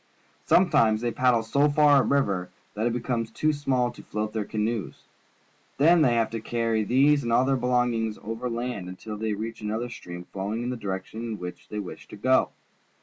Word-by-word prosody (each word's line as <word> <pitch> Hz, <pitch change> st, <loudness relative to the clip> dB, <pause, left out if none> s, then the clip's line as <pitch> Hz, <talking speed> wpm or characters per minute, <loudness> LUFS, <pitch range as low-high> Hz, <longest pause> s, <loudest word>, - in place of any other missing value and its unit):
Some 180 Hz, 0 st, +4 dB
times 110 Hz, -1 st, +3 dB
they 120 Hz, 0 st, 0 dB
paddle 120 Hz, -1 st, +2 dB
so 140 Hz, +6 st, +2 dB
far 145 Hz, 0 st, +5 dB
up 135 Hz, -, +3 dB
a -, -, -2 dB
river 100 Hz, -10 st, +1 dB, 0.2 s
that 110 Hz, +3 st, -1 dB
it 120 Hz, -, 0 dB
liecomes 120 Hz, -2 st, -2 dB
too 155 Hz, 0 st, +1 dB
small 130 Hz, -4 st, 0 dB
to -, -, -13 dB
float 105 Hz, 0 st, -4 dB
their 110 Hz, -2 st, -2 dB
canoes. 110 Hz, -1 st, -3 dB, 0.7 s
Then 165 Hz, +4 st, +5 dB
they 125 Hz, -5 st, +4 dB
have 115 Hz, -1 st, +1 dB
to 115 Hz, -1 st, -4 dB
carry 115 Hz, -1 st, 0 dB
these 140 Hz, +6 st, +4 dB
and 120 Hz, -3 st, -3 dB
all 125 Hz, +2 st, +4 dB
their 135 Hz, 0 st, +2 dB
belongings 120 Hz, -3 st, 0 dB
over 115 Hz, +3 st, -4 dB
land 115 Hz, -6 st, -4 dB
until 105 Hz, +4 st, -7 dB
they 110 Hz, 0 st, -2 dB
reach 115 Hz, +2 st, -6 dB
another 110 Hz, +3 st, -3 dB
stream 90 Hz, -6 st, -8 dB
flowing 100 Hz, +4 st, -3 dB
in 125 Hz, -, -2 dB
the -, -, -3 dB
direction 100 Hz, 0 st, -5 dB
in 115 Hz, -2 st, -4 dB
which 90 Hz, -1 st, -8 dB
they 105 Hz, -, -5 dB
wish 100 Hz, -3 st, -7 dB
to -, -, -10 dB
go. 130 Hz, +5 st, +3 dB
115 Hz, 205 wpm, -26 LUFS, 105-125 Hz, 0.7 s, far